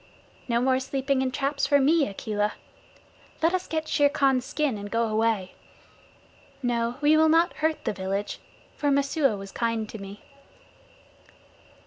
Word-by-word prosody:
"No 235 Hz, -2 st, +1 dB
more 260 Hz, +1 st, +2 dB
sleeping 265 Hz, 0 st, -1 dB
in 260 Hz, -, 0 dB
traps 275 Hz, +2 st, -1 dB
for 285 Hz, 0 st, +4 dB
me, 290 Hz, +2 st, +3 dB
Akela. 210 Hz, +1 st, -2 dB, 0.9 s
Let 330 Hz, +2 st, +3 dB
us 370 Hz, 0 st, -1 dB
get 315 Hz, -1 st, -2 dB
Shere 290 Hz, -1 st, +3 dB
Khan's 270 Hz, -3 st, +2 dB
skin 295 Hz, -6 st, -1 dB
and 205 Hz, 0 st, -7 dB
go 230 Hz, +2 st, +1 dB
away. 215 Hz, -3 st, 0 dB, 1.1 s
No, 235 Hz, -1 st, 0 dB
we 300 Hz, +1 st, +5 dB
will 315 Hz, 0 st, +5 dB
not 330 Hz, +2 st, +3 dB
hurt 315 Hz, 0 st, 0 dB
the -, -, 0 dB
village, 195 Hz, +1 st, -3 dB, 0.4 s
for 290 Hz, -, 0 dB
Messua 280 Hz, -4 st, +2 dB
was 195 Hz, 0 st, -9 dB
kind 230 Hz, -1 st, -1 dB
to 220 Hz, -, -8 dB
me." 200 Hz, +1 st, -10 dB
260 Hz, 150 wpm, -26 LUFS, 220-290 Hz, 1.1 s, we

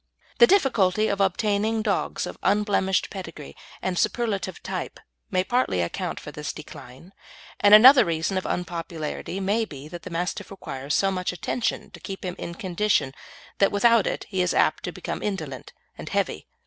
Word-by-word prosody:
The 475 Hz, -, +9 dB
difficulty 220 Hz, -, +3 dB
of 200 Hz, 0 st, 0 dB
obtaining 210 Hz, +3 st, +1 dB
dogs 205 Hz, -3 st, -1 dB
of -, -, -8 dB
unblemished 200 Hz, -2 st, +1 dB
pedigree 165 Hz, -7 st, -8 dB, 0.3 s
and 180 Hz, -2 st, -1 dB
superlative 200 Hz, -7 st, -1 dB
type -, -, -5 dB, 0.3 s
may 185 Hz, -, +1 dB
partly 240 Hz, -, +1 dB
account 85 Hz, -, -3 dB
for -, -, -9 dB
this -, -, -5 dB
decline, 150 Hz, +10 st, -12 dB, 0.5 s
and 205 Hz, +1 st, +8 dB
another 255 Hz, +5 st, +9 dB
reason 170 Hz, +3 st, -1 dB
of 185 Hz, -, -2 dB
unpopularity 170 Hz, 0 st, -4 dB
may 205 Hz, +4 st, +1 dB
be 145 Hz, -8 st, -8 dB
that 175 Hz, +1 st, -8 dB
the 185 Hz, -, -8 dB
Mastiff 180 Hz, +4 st, -3 dB
requires 140 Hz, -7 st, -4 dB
so 195 Hz, 0 st, +2 dB
much 185 Hz, -1 st, -2 dB
attention 225 Hz, +6 st, -3 dB
to -, -, -12 dB
keep 195 Hz, -1 st, -7 dB
him 180 Hz, -1 st, -3 dB
in 170 Hz, -, -6 dB
condition 185 Hz, -7 st, 0 dB, 0.5 s
that 195 Hz, -, +4 dB
without 230 Hz, +1 st, +4 dB
it -, -, -3 dB
he 190 Hz, -2 st, 0 dB
is 180 Hz, -, 0 dB
apt -, -, +2 dB
to -, -, -3 dB
become -, -, -5 dB
indolent 155 Hz, -, -4 dB, 0.3 s
and -, -, -6 dB
heavy. -, -, -2 dB
190 Hz, 170 wpm, -25 LUFS, 170-210 Hz, 0.5 s, The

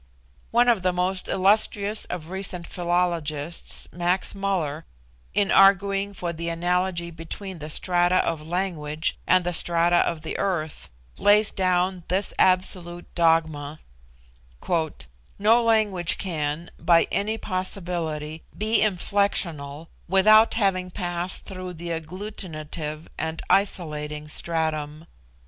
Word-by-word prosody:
One 240 Hz, +1 st, +3 dB
of 230 Hz, -5 st, +4 dB
the 185 Hz, 0 st, +2 dB
most 180 Hz, +1 st, -1 dB
illustrious 205 Hz, +2 st, +2 dB
of 170 Hz, -1 st, -6 dB
recent 190 Hz, -2 st, -4 dB
philologists, 170 Hz, -4 st, -2 dB
Max 175 Hz, +2 st, +1 dB
Muller, 180 Hz, -7 st, -2 dB, 0.5 s
in 205 Hz, -1 st, +2 dB
arguing 195 Hz, +1 st, +4 dB
for 175 Hz, -2 st, -3 dB
the 170 Hz, +1 st, -4 dB
analogy 175 Hz, 0 st, -1 dB
between 170 Hz, +3 st, -7 dB
the 150 Hz, 0 st, -7 dB
strata 175 Hz, +2 st, +2 dB
of 165 Hz, -2 st, -1 dB
language 160 Hz, -2 st, -2 dB
and 185 Hz, 0 st, +4 dB
the 175 Hz, -, -1 dB
strata 170 Hz, +1 st, +2 dB
of 170 Hz, -2 st, +1 dB
the 160 Hz, -, -4 dB
earth, 170 Hz, -6 st, -2 dB, 0.3 s
lays 210 Hz, +1 st, +5 dB
down 185 Hz, 0 st, +1 dB
this 190 Hz, +3 st, 0 dB
absolute 180 Hz, -2 st, +1 dB
dogma: 160 Hz, -3 st, +1 dB, 1.6 s
"No 225 Hz, +4 st, +4 dB
language 215 Hz, -7 st, +2 dB
can, 165 Hz, -2 st, -3 dB
by 170 Hz, -1 st, +4 dB
any 205 Hz, +4 st, 0 dB
possibility, 170 Hz, -6 st, -3 dB, 0.2 s
be 220 Hz, +2 st, +2 dB
inflectional 175 Hz, -7 st, 0 dB, 0.2 s
without 215 Hz, +5 st, +5 dB
having 190 Hz, -4 st, +1 dB
passed 175 Hz, 0 st, -3 dB
through 185 Hz, -1 st, -6 dB
the 170 Hz, +1 st, -7 dB
agglutinative 160 Hz, -3 st, -6 dB
and 160 Hz, +1 st, -3 dB
isolating 150 Hz, -6 st, 0 dB
stratum. 155 Hz, -1 st, -2 dB
175 Hz, 115 wpm, -24 LUFS, 160-195 Hz, 1.6 s, lays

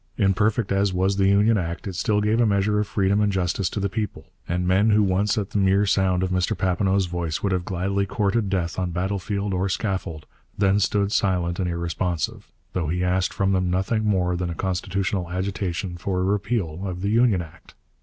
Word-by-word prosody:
Imperfect 105 Hz, +2 st, +1 dB
as 100 Hz, 0 st, +2 dB
was 95 Hz, +2 st, +1 dB
the 95 Hz, -1 st, +3 dB
Union 105 Hz, +2 st, +4 dB
Act, 85 Hz, -1 st, -4 dB
it 95 Hz, -, -4 dB
still 105 Hz, +4 st, +1 dB
gave 110 Hz, +3 st, +2 dB
a -, -, +4 dB
measure 105 Hz, +1 st, +2 dB
of 105 Hz, -, -1 dB
freedom 100 Hz, 0 st, +1 dB
and 105 Hz, -1 st, +2 dB
justice 90 Hz, -1 st, 0 dB
to -, -, -4 dB
the 100 Hz, -, 0 dB
people, 105 Hz, +1 st, -4 dB, 0.2 s
and 90 Hz, +1 st, -1 dB
men 95 Hz, +4 st, +3 dB
who 105 Hz, 0 st, +4 dB
once 100 Hz, +3 st, +1 dB
at 100 Hz, -2 st, -2 dB
the 105 Hz, -, 0 dB
mere 95 Hz, +1 st, +3 dB
sound 95 Hz, -2 st, +2 dB
of 95 Hz, -, -1 dB
Mr 90 Hz, -1 st, 0 dB
Papineau's 95 Hz, +1 st, +1 dB
voice 85 Hz, -2 st, -3 dB
would 100 Hz, -, +1 dB
have 90 Hz, -1 st, -1 dB
gladly 100 Hz, +2 st, -1 dB
courted 100 Hz, +1 st, 0 dB
death 90 Hz, -2 st, -1 dB
on 90 Hz, -1 st, -1 dB
battle 95 Hz, +3 st, -2 dB
field 100 Hz, +1 st, -3 dB
or 95 Hz, +2 st, 0 dB
scaffold, 95 Hz, -6 st, -3 dB, 0.3 s
then 100 Hz, 0 st, +3 dB
stood 100 Hz, 0 st, +1 dB
silent 90 Hz, -4 st, 0 dB
and 90 Hz, -2 st, 0 dB
irresponsive, 85 Hz, -1 st, -2 dB, 0.3 s
though 85 Hz, -4 st, -1 dB
he 90 Hz, +3 st, -1 dB
asked 90 Hz, +1 st, +1 dB
from 95 Hz, 0 st, 0 dB
them 90 Hz, -1 st, +1 dB
nothing 95 Hz, +5 st, 0 dB
more 90 Hz, -4 st, +1 dB
than 90 Hz, 0 st, -2 dB
a 85 Hz, -, -4 dB
constitutional 95 Hz, 0 st, -2 dB
agitation 95 Hz, -1 st, -3 dB
for 90 Hz, +1 st, -2 dB
a -, -, +1 dB
repeal 95 Hz, -4 st, -1 dB
of 90 Hz, -1 st, -5 dB
the 100 Hz, -, 0 dB
Union 110 Hz, -5 st, +3 dB
Act. 80 Hz, -, -16 dB
95 Hz, 210 wpm, -24 LUFS, 90-100 Hz, 0.3 s, Union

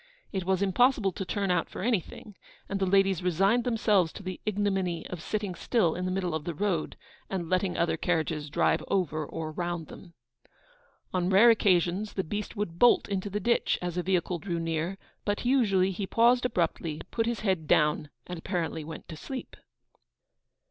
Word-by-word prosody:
It 190 Hz, -2 st, -2 dB
was 190 Hz, +1 st, +1 dB
impossible 210 Hz, +1 st, +3 dB
to 190 Hz, -, -5 dB
turn 195 Hz, 0 st, -1 dB
out 180 Hz, -2 st, +1 dB
for -, -, -6 dB
anything, 215 Hz, -2 st, -2 dB, 0.3 s
and 200 Hz, -, -2 dB
the 190 Hz, -, +1 dB
ladies 195 Hz, -1 st, +3 dB
resigned 195 Hz, +7 st, +2 dB
themselves 210 Hz, -8 st, +2 dB
to 205 Hz, -, -9 dB
the 185 Hz, -1 st, -6 dB
ignominy 195 Hz, -5 st, 0 dB
of 180 Hz, -3 st, -6 dB
sitting 205 Hz, 0 st, -3 dB
still, 175 Hz, -1 st, +1 dB
in 180 Hz, -, -3 dB
the 185 Hz, -, -1 dB
middle 185 Hz, -2 st, -1 dB
of 160 Hz, -1 st, -2 dB
the 170 Hz, 0 st, -4 dB
road, 185 Hz, -2 st, -1 dB, 0.3 s
and 180 Hz, -3 st, -3 dB
letting 185 Hz, 0 st, +1 dB
other 165 Hz, -1 st, +1 dB
carriages 160 Hz, -3 st, -1 dB
drive -, -, +2 dB
over 160 Hz, -5 st, 0 dB
or 155 Hz, +1 st, -5 dB
round 175 Hz, -1 st, -4 dB
them. 170 Hz, -3 st, -13 dB, 1.0 s
On 180 Hz, -1 st, +1 dB
rare 205 Hz, +5 st, +7 dB
occasions 195 Hz, -1 st, +2 dB
the 190 Hz, -, -1 dB
beast 205 Hz, +7 st, -4 dB
would 175 Hz, -5 st, -4 dB
bolt 245 Hz, -, +5 dB
into 200 Hz, 0 st, -2 dB
the 205 Hz, +1 st, -2 dB
ditch 235 Hz, +2 st, +1 dB
as 175 Hz, -1 st, -4 dB
a 180 Hz, -, 0 dB
vehicle 180 Hz, -1 st, 0 dB
drew 175 Hz, 0 st, -3 dB
near; 165 Hz, +3 st, -2 dB, 0.3 s
but 205 Hz, +3 st, -2 dB
usually 200 Hz, -8 st, +3 dB
he 195 Hz, +1 st, -4 dB
paused 240 Hz, +3 st, +4 dB
abruptly, 170 Hz, -7 st, -1 dB
put 225 Hz, -1 st, 0 dB
his 235 Hz, -2 st, -2 dB
head 185 Hz, -7 st, 0 dB
down, 150 Hz, -1 st, +2 dB, 0.2 s
and 180 Hz, -2 st, -6 dB
apparently 165 Hz, -3 st, -2 dB
went 160 Hz, +2 st, -9 dB
to 160 Hz, -, -6 dB
sleep. 260 Hz, -, -7 dB
185 Hz, 185 wpm, -28 LUFS, 170-205 Hz, 1.0 s, rare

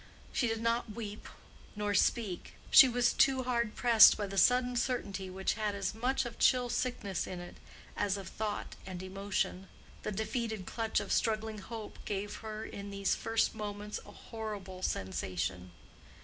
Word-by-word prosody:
She 245 Hz, -, +2 dB
did 225 Hz, 0 st, -2 dB
not 230 Hz, -1 st, 0 dB
weep 210 Hz, -3 st, -6 dB, 0.5 s
nor 205 Hz, 0 st, -1 dB
speak; 200 Hz, -2 st, 0 dB, 0.2 s
she 265 Hz, -, +10 dB
was 245 Hz, 0 st, +2 dB
too 265 Hz, -1 st, +4 dB
hard 235 Hz, -3 st, 0 dB
pressed 235 Hz, -3 st, +8 dB
by 205 Hz, -, -1 dB
the 195 Hz, 0 st, -6 dB
sudden 250 Hz, 0 st, +4 dB
certainty 200 Hz, -6 st, -2 dB
which 190 Hz, +1 st, -1 dB
had 210 Hz, -2 st, -2 dB
as 195 Hz, 0 st, -2 dB
much 250 Hz, +4 st, 0 dB
of 235 Hz, -1 st, -7 dB
chill 250 Hz, -1 st, +4 dB
sickness 240 Hz, -7 st, -2 dB
in 180 Hz, -, -5 dB
it 175 Hz, -, -10 dB, 0.4 s
as 205 Hz, -1 st, 0 dB
of 195 Hz, -3 st, -7 dB
thought 210 Hz, +2 st, -4 dB
and 185 Hz, -1 st, -7 dB
emotion. 195 Hz, 0 st, -2 dB, 0.3 s
The -, -, -3 dB
defeated 220 Hz, -1 st, -2 dB
clutch 225 Hz, +2 st, -1 dB
of -, -, -5 dB
struggling 220 Hz, -1 st, 0 dB
hope 220 Hz, +1 st, -8 dB
gave 205 Hz, 0 st, -3 dB
her 220 Hz, 0 st, -6 dB
in 200 Hz, 0 st, -7 dB
these 200 Hz, -1 st, 0 dB
first 225 Hz, 0 st, +1 dB
moments 210 Hz, -1 st, -5 dB
a -, -, -13 dB
horrible 205 Hz, -5 st, -7 dB
sensation. 90 Hz, -, -2 dB
215 Hz, 165 wpm, -32 LUFS, 195-230 Hz, 0.5 s, she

